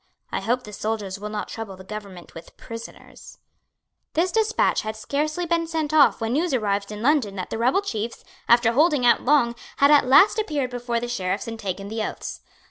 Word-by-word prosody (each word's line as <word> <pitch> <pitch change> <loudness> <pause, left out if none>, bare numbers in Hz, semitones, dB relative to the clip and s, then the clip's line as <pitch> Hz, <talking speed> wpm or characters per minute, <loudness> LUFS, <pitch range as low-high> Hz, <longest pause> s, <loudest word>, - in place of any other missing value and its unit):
I - - -1
hope 245 +5 -1
the 210 - -10
soldiers 205 -2 -3
will 210 +1 -5
not 210 -1 -4
trouble 215 -4 -7
the 190 - -11
government 195 -3 -9
with 165 - -12
prisoners." 230 0 -11 0.8
This 350 +3 +1
despatch 445 +2 +2
had 215 0 -5
scarcely 305 +9 -2
been 335 0 0
sent 315 -2 -2
off 300 -2 +5
when 225 0 -2
news 315 0 +1
arrived 205 -3 -1
in 210 +1 -6
London 260 -8 +2
that 185 - -5
the 225 - -3
rebel 255 - +2
chiefs, 225 - -4 0.3
after 235 -1 +5
holding 295 0 +3
out 240 - +5
long, 250 -4 +3 0.2
had 280 +1 +5
at 290 -3 +5
last 375 - +6
appeared 295 -11 -1
before 240 -1 -2
the 240 - -4
Sheriffs 195 -4 -2
and 225 -1 -6
taken 195 -1 -4
the 220 +2 -4
oaths. - - -5
235 Hz, 200 wpm, -24 LUFS, 210-295 Hz, 0.8 s, last